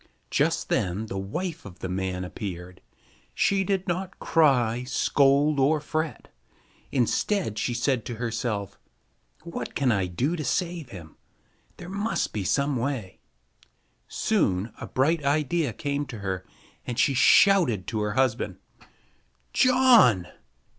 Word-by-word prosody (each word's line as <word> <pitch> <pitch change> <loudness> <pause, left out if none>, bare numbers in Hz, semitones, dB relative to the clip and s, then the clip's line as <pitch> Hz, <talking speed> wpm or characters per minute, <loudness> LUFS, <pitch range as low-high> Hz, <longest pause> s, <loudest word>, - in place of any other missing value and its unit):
Just - - +1
then 95 +4 0
the 95 -3 -5
wife 165 - -4
of 95 -3 -11
the - - -5
man 95 0 -3
appeared. 90 -2 -7 0.5
She 195 -1 +2
did 190 0 -1
not 185 +2 -3
cry, 125 -7 +2
scold, 140 +2 +2
or 150 +3 +3
fret. 155 +1 -4 0.6
Instead, 130 - 0
she 120 - -1
said 120 -1 0
to 120 - -5
herself, 110 -3 -3 0.6
"What 170 0 -6
can 135 -3 +2
I 95 -4 +1
do 130 - -1
to 155 - -4
save 170 0 -2
him? 85 -7 -11 0.6
There 175 - -9
must 200 +4 -2
be 105 - -2
some 140 +7 +1
way." 120 -6 -3 0.9
Soon 95 +5 0
a - - -5
bright 150 +4 +1
idea 150 +1 +1
came 140 +4 -3
to 115 - -7
her, 95 -3 -4 0.4
and 120 - -5
she 125 +3 +3
shouted 135 - +5
to 110 - -2
her 105 0 -1
husband: 130 -2 0 1.0
"John! 250 - +5
130 Hz, 135 wpm, -26 LUFS, 105-160 Hz, 1.0 s, shouted